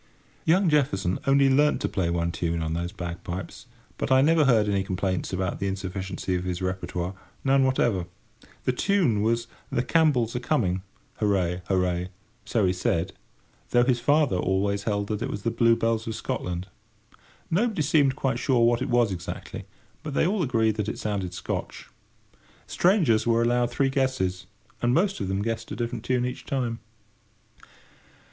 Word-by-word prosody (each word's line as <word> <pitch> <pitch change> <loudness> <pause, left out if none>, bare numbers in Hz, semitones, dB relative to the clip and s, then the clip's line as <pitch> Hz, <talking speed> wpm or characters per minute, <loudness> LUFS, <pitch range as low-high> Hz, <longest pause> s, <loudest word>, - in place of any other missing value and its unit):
Young 180 +4 +4
Jefferson 100 - +1
only 140 0 +5
learnt 145 +3 +3
to - - 0
play 90 -3 -1
one 85 0 0
tune 85 -1 -2
on 80 0 -2
those 85 +1 -3
bagpipes; 85 +1 -6 0.3
but - - -2
I 130 0 +6
never 160 0 +4
heard 110 -5 +4
any 100 -1 +1
complaints 95 0 -2
about 95 -1 -2
the 100 - -1
insufficiency 95 -1 -3
of 90 0 -1
his 90 -1 -3
repertoire—none 95 +8 -1
whatever. 120 -9 +1 0.6
This 130 -1 0
tune 175 - +2
was 115 +2 +1 0.3
"The 120 - 0
Campbells 130 -6 +2
are - - 0
Coming, 115 -9 0 0.4
Hooray—Hooray!" 90 -2 0 0.4
so 110 -2 +1
he 90 - +2
said, 90 -1 -1 0.6
though 120 0 +4
his 125 -1 +2
father 145 -6 +3
always 100 +2 0
held 100 -2 0
that 105 -1 -2
it - - -2
was 100 - -5
"The 115 - 0
Blue 115 0 +4
Bells 115 -1 -1
of 110 - -3
Scotland." 90 -4 -4 0.8
Nobody 200 -1 +1
seemed 140 -2 +3
quite 130 -3 -1
sure 125 -4 +3
what 120 0 +2
it - - -2
was 120 -3 +3
exactly, 90 -1 -6 0.4
but 150 -3 -6
they - - +3
all 195 +2 +1
agreed 110 -7 +1
that 105 -1 -1
it - - -5
sounded 95 -4 -3
Scotch. - - -5 0.8
Strangers 165 - +2
were 115 0 +3
allowed 120 0 +2
three 135 +2 +1
guesses, 125 -9 -1 0.3
and 120 +1 +2
most 195 +4 +1
of 95 - -2
them 95 +1 -1
guessed 115 0 -3
a - - -3
different 120 -1 -3
tune 125 -1 +1
each 125 - -5
time. 120 -4 -2
110 Hz, 165 wpm, -26 LUFS, 95-130 Hz, 0.8 s, I